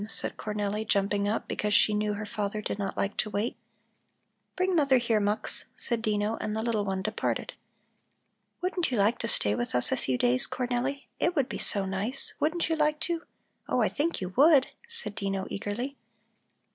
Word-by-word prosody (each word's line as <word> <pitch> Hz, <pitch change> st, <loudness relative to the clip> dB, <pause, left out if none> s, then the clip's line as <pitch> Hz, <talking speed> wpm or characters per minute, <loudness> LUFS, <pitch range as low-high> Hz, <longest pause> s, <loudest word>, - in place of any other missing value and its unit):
said -, -, +1 dB
Cornelli, 210 Hz, 0 st, -2 dB
jumping 200 Hz, -1 st, +1 dB
up 215 Hz, +2 st, -1 dB
because 210 Hz, 0 st, 0 dB
she 210 Hz, -, +5 dB
knew 210 Hz, 0 st, +1 dB
her 210 Hz, +1 st, -4 dB
father 205 Hz, 0 st, -2 dB
did 210 Hz, -, -3 dB
not 200 Hz, -, -3 dB
like 200 Hz, -, 0 dB
to 215 Hz, -, 0 dB
wait. 210 Hz, +3 st, -1 dB, 1.0 s
"Bring 370 Hz, 0 st, +1 dB
mother 280 Hz, -5 st, +5 dB
here, 235 Hz, -3 st, +2 dB
Mux," 205 Hz, +1 st, 0 dB
said 235 Hz, -2 st, -1 dB
Dino, 210 Hz, 0 st, 0 dB
and 215 Hz, -, -2 dB
the 220 Hz, -, -1 dB
little 225 Hz, -3 st, +1 dB
one 190 Hz, -1 st, -2 dB
departed. 215 Hz, +2 st, -1 dB, 1.1 s
"Wouldn't 360 Hz, -1 st, 0 dB
you 250 Hz, -, -1 dB
like 210 Hz, +4 st, +3 dB
to 230 Hz, -, -1 dB
stay 105 Hz, -, +1 dB
with 120 Hz, +3 st, -2 dB
us 125 Hz, -, +2 dB
a -, -, +3 dB
few 130 Hz, -1 st, 0 dB
days, 125 Hz, +1 st, +2 dB
Cornelli? 250 Hz, +2 st, -2 dB
It 345 Hz, +1 st, +1 dB
would 275 Hz, -5 st, +2 dB
be -, -, -5 dB
so 200 Hz, -3 st, +1 dB
nice. 200 Hz, +8 st, -1 dB
Wouldn't 320 Hz, +4 st, +1 dB
you 325 Hz, -, +1 dB
like 300 Hz, -1 st, +2 dB
to? 340 Hz, -1 st, 0 dB, 0.5 s
Oh, -, -, +2 dB
I -, -, +3 dB
think 320 Hz, +4 st, -1 dB
you 185 Hz, -, -2 dB
would!" 275 Hz, -, +6 dB, 0.2 s
said 465 Hz, -, -4 dB
Dino 195 Hz, -1 st, -2 dB
eagerly. 240 Hz, +8 st, -3 dB
215 Hz, 190 wpm, -29 LUFS, 200-275 Hz, 1.1 s, would